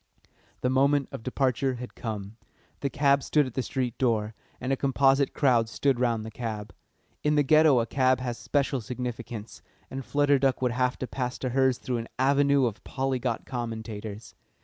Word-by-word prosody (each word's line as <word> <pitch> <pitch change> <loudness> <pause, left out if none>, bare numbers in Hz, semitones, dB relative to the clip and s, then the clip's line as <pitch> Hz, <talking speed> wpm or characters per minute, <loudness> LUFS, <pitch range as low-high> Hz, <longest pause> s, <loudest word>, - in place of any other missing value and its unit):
The 125 - +1
moment 140 +1 +3
of - - -6
departure 130 +1 0
had 125 0 -8
come. 105 -2 -6 0.4
The 140 - -1
cab 140 0 +3
stood 150 +2 +2
at 130 - -7
the 130 - -1
street 125 -2 -2
door, 110 -4 +1 0.3
and 130 +2 -1
a - - +3
composite 135 0 +3
crowd 120 -6 +2
stood 135 +1 +1
round 115 -3 +1
the 110 - -7
cab. 110 -3 -5 0.5
In 150 0 +2
the 145 - +4
Ghetto 155 -2 +5
a 115 - +1
cab 130 +1 +2
has 120 -2 -4
special 140 -2 0
significance, 120 -1 -6 0.3
and 135 0 -4
Flutter 145 +1 +2
Duck 135 -1 +2
would 125 -2 +1
have 125 +1 0
to - - -3
pass 125 -1 -3
to 130 - -3
hers 130 0 +2
through 125 -2 -3
an 115 0 -5
avenue 140 0 +3
of 110 -3 -3
polyglot 130 -3 -2
commentators. 110 -3 -6
130 Hz, 180 wpm, -27 LUFS, 115-135 Hz, 0.5 s, Ghetto